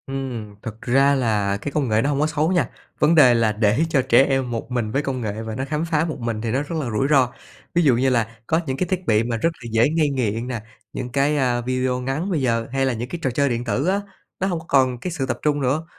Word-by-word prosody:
Ừm, 125 -6 -5
thực 115 -2 -8
ra 135 +3 +3
là 105 -6 0
cái 140 +8 -5
công 140 -4 0
nghệ 110 0 +3
nó 140 - 0
hông 140 -1 0
có 150 - +2
xấu 155 +2 0
nha, 175 -2 +1 0.3
vấn 155 +3 +4
đề 135 -6 +7
là 115 -2 +2
để 105 +6 +2
cho 140 -5 +3
trẻ 130 +1 +5
em 135 -3 0
một 115 +1 -5
mình 120 -3 -1
với 140 - +1
công 135 -3 -3
nghệ 110 -1 -3
và 110 -1 -5
nó 130 - -3
khám 150 +3 -2
phá 160 -1 +1
một 160 - -5
mình 115 -2 -3
thì 115 -1 -2
nó 130 +4 +1
rất 155 +3 -6
là 135 -6 -3
rủi 110 +6 +1
ro. 135 -5 +4 0.5
Ví 175 - +4
dụ 135 -6 +5
như 130 +3 +2
là 115 -2 0
có 160 +2 +2
những 130 0 -2
cái 180 - -1
thiết 185 0 -2
bị 110 0 +3
mà 115 0 -2
rất 165 - +2
là 120 - -6
dễ 115 +4 +3
ngây 155 -1 +1
nghiện 120 -3 -1
nè, 120 -4 -4 0.3
những 125 - -4
cái, 140 +4 +1
à, 125 -3 +1
video 130 +1 -1
ngắn 135 +9 -2
bây 160 -6 0
giờ 115 -3 0
hay 135 0 +1
là 130 - +1
những 120 +2 -5
cái 175 - -5
trò 135 - 0
chơi 140 +3 +1
điện 120 -1 -2
tử 125 +7 -1
á, 195 +2 +1 0.4
nó 190 - 0
hông 175 -4 -1
có 160 - -13
còn 130 -3 +2
cái 180 - -4
sự 150 -6 -2
tập 130 - -3
trung 145 -1 +1
nữa. 140 +5 0
130 Hz, 290 wpm, -22 LUFS, 115-145 Hz, 0.5 s, đề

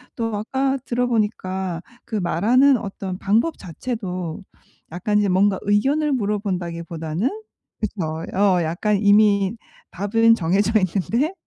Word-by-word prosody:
또 225 -2 -2
아까 265 +6 -1
들어보니까 210 -7 -1 0.2
그 220 - -6
말하는 225 - +3
어떤 195 -2 -6
방법 225 +11 +1
자체도 185 -2 -5 0.5
약간 210 +5 0
이제 205 -1 +1
뭔가 190 +1 +3
의견을 275 +10 +1
물어본다기 200 -8 -2
보다는 165 +7 -2 0.5
그쵸. 165 -7 -3
어 190 -3 +3
약간 175 +6 0
이미 205 0 +4 0.4
답은 225 +4 +3
정해져 195 +2 +1
있는데 215 - 0
205 Hz, 265 characters per minute, -22 LUFS, 185-225 Hz, 0.5 s, 이미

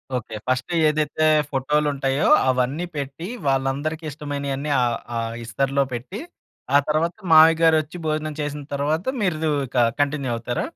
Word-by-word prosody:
Okay. 115 -2 -5
First 130 +5 -1 0.2
ఏదైతే 155 +1 -1 0.3
ఫోటో‌లుంటాయో 140 0 0 0.2
అవన్నీ 130 +7 0
పెట్టి 140 +5 -5 0.2
వాళ్ళందరికి 135 +4 -1
ఇష్టమైనియన్నీ 140 0 -4
ఆహ్, 120 -1 +1 0.2
ఆ - - -1 0.3
ఇస్తరులో 135 +4 0
పెట్టి 130 - -6 0.6
ఆ - - +9
తర్వాత 160 +3 0 0.2
మామయ్య‌గారొచ్చి 160 0 +5
భోజనం 155 0 -2
చేసిన 145 0 -4
తరువాత 150 +5 -1 0.2
మీరు 180 -5 0
దు 155 - +2 0.2
ఇక 120 -2 +3
కంటిన్యూ 140 -3 -1
అవుతారా? 120 +1 -3
145 Hz, 130 wpm, -22 LUFS, 135-155 Hz, 0.6 s, ఆ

